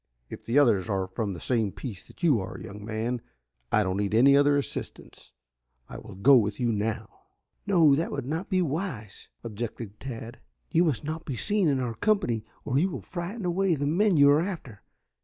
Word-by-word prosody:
"If - - -9
the 120 +4 +1
others 115 -8 +4
are 95 -2 0
from 100 +2 -3
the 85 - -8
same 115 -5 0
piece 105 -5 -8
that - - -18
you 145 -9 +4
are, 95 0 -6
young 100 +3 -9
man, 115 +3 -3 0.5
I 105 - +4
don't 95 0 -2
need 100 +1 -1
any 135 +4 +6
other 145 0 +4
assistance. 140 - -6 0.5
I - - -8
will - - -11
go 130 +8 +6
with 105 -1 0
you 120 -2 +1
now." 110 0 -4 0.4
"No, 170 -7 +5
that 160 +5 0
will 140 - -3
not 160 +8 -4
be 185 -2 +2
wise," 140 - -5 0.2
objected 115 -1 -6
Tad. 120 -2 -7 0.3
"You 170 +1 +4
must 150 -5 -1
not 160 +2 -4
be 135 - -4
seen 205 - +1
in 140 -3 +2
our 125 -2 -2
company 120 - 0 0.2
or 130 - +1
you 185 +5 +2
will - - -6
frighten 185 +4 -5
away 180 0 +1
the 145 -1 -2
men 180 +5 +2
you 140 0 +7
are 145 +2 +4
after. 165 - -6
130 Hz, 200 wpm, -27 LUFS, 110-165 Hz, 0.5 s, you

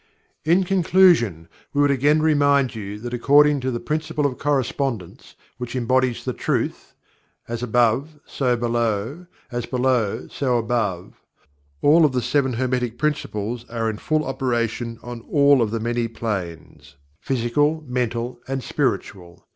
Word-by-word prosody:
In 175 +4 +4
conclusion 175 - +3 0.3
we 145 - +2
would 145 0 +4
again 145 +3 +3
remind 140 -4 +3
you 105 -2 -6
that 120 +1 -6
according 145 +4 +4
to 130 0 -2
the 120 -2 -2
Principle 155 0 -2
of 130 -3 -1
Correspondence, 135 -7 -2 0.2
which 125 0 -5
embodies 130 0 +1
the - - -1
truth: - - -3 0.5
"As 115 0 -4
Above 125 +5 +1
so 125 -3 0
Below; 120 - -1 0.2
as 120 -1 -3
Below, 125 -5 0
so 125 -3 0
Above," 110 -6 -2 0.6
all 160 +3 +6
of 145 -4 +3
the 125 - 0
Seven 130 +1 +1
Hermetic 125 -1 -1
Principles 120 -6 -2
are 115 -1 -1
in 105 - -8
full 155 0 0
operation 120 -3 -2
on 120 -1 -7
all 140 -2 +5
of 115 - +1
the 115 +1 -2
many 120 +1 -1
planes, 95 -11 -6 0.2
Physical 145 +5 0
Mental 120 -1 -2
and 135 -1 -3
Spiritual. 90 -6 -3
125 Hz, 140 wpm, -22 LUFS, 115-145 Hz, 0.6 s, all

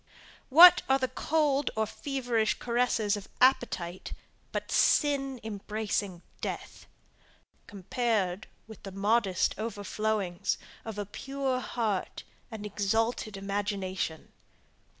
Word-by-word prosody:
What 350 +6 +10
are 265 - +5
the 260 -1 -1
cold 290 +1 +1
or 220 0 +1
feverish 240 -3 -1
caresses 235 -3 0
of 205 -1 -8
appetite, 190 -9 +1 0.4
but - - -4
sin 275 -3 +2
embracing 205 -3 -3 0.2
death, - - -6 0.8
compared 200 -1 -1 0.2
with 220 -1 -12
the 195 - -8
modest 200 -1 +1
overflowings 210 -3 -2 0.3
of 220 -2 -6
a 205 - -3
pure 270 +4 -3
heart 220 -6 -3 0.3
and 220 -3 -7
exalted 215 +1 -1
imagination? 195 -4 -3
220 Hz, 100 wpm, -29 LUFS, 200-250 Hz, 0.8 s, What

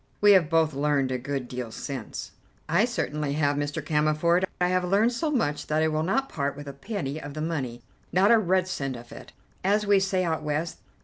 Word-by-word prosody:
We 205 0 +6
have 180 -6 +5
both 160 -2 +3
learned 140 -1 +1
a 130 - -1
good 135 0 -3
deal 125 -2 -5
since." 130 -1 -6 0.4
"I 175 +8 +3
certainly 150 - -2
have, 145 -1 +1
Mr. 145 +1 -3
Cammerford. 155 +4 +2
I 180 0 +2
have 185 0 +1
learned 200 +6 +3
so 305 +6 -1
much 185 - -1
that 155 +1 +1
I - - +3
will 155 0 0
not 265 +12 0
part 140 - -3
with 145 0 -8
a 140 - -6
penny 155 -2 -4
of 145 -1 -8
the - - -4
money; 135 -7 -3 0.3
not 190 +5 +4
a 230 - +7
red 185 -2 +1
cent 135 -7 -3
of 120 0 -11
it, - - -11 0.3
as 205 +3 +2
we 200 -1 +5
say 190 -1 0
out 160 -2 -1
West. 155 +2 -2
155 Hz, 215 wpm, -26 LUFS, 145-185 Hz, 0.4 s, a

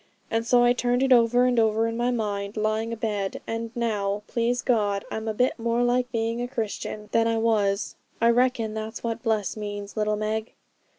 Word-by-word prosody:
And 225 0 0
so 245 0 +5
I 240 0 +5
turned 245 +1 +1
it 265 -1 +5
over 245 +1 +4
and 250 -2 +3
over 220 0 +2
in 230 0 -2
my 240 +1 0
mind, 205 -3 -2
lying 215 +1 0
abed; 210 -4 -2
and 230 0 -3
now, 210 -3 -1
please 240 +1 -1
God, 205 -5 +1
I'm 220 0 -4
a 220 - 0
bit 250 +2 +1
more 235 +1 +1
like 245 +1 +1
being 230 0 -1
a 245 - -2
Christian 215 -3 -4
than 230 0 +3
I 230 0 +1
was. 210 -3 +1 0.2
I 230 0 +5
reckon 240 -3 +1
that's 220 +1 -5
what 230 -1 -2
bless 220 -4 0
means, 205 -1 -6
little 210 -1 +1
Meg.' 215 +1 -3
225 Hz, 195 wpm, -25 LUFS, 215-240 Hz, 0.2 s, so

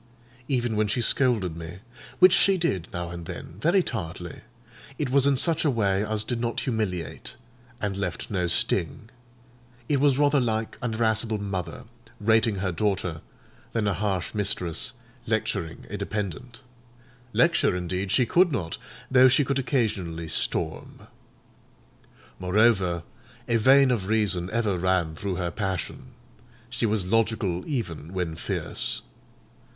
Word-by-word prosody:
Even 120 -4 0
when 105 0 +2
she 105 +4 -1
scolded 115 -7 +1
me—which 100 - +1
she 195 0 +5
did, 95 - -1
now 85 -1 -4
and 85 -1 -7
then, 85 - -8
very 175 - +3
tartly—it 115 - -7
was 140 0 +5
in 140 - +4
such 160 +4 +3
a 155 - +3
way 100 -5 +1
as 110 0 -1
did 115 +1 -3
not 120 -1 -1
humiliate, 105 - -3 0.4
and 100 -2 -2
left 95 -1 -4
no 90 -3 0
sting; 85 +4 0 0.8
it 145 -2 +2
was 140 -2 +3
rather 145 0 +4
like 110 -3 -1
an 120 -3 -2
irascible 110 -1 +1
mother 95 -6 -4 0.4
rating 110 0 +3
her 95 -1 -1
daughter, 90 -4 -1 0.5
than 110 -3 0
a 100 - +2
harsh 95 -1 -2
mistress 95 -5 -1 0.3
lecturing 80 0 -2
a 105 - -3
dependant: 105 +4 -5 0.7
lecture, 165 - +3
indeed, 90 +2 -2
she 125 +5 +4
could 175 +8 +4
not, 90 - -3 0.3
though 130 0 +7
she 135 +3 +4
could 140 +1 0
occasionally 100 - -1
storm. - - -2 1.4
Moreover, 95 -3 +2 0.4
a 120 -1 +3
vein 135 +3 +6
of 105 -6 -1
reason 100 -5 +1
ever 110 -5 0
ran 90 -3 +1
through 95 +2 -3
her 90 -1 -2
passion: 105 +8 -4 0.6
she 120 -2 0
was 105 -3 -1
logical 110 -5 +1
even 95 - -4
when 90 -4 -2
fierce. - - -2
105 Hz, 135 wpm, -26 LUFS, 90-120 Hz, 1.4 s, though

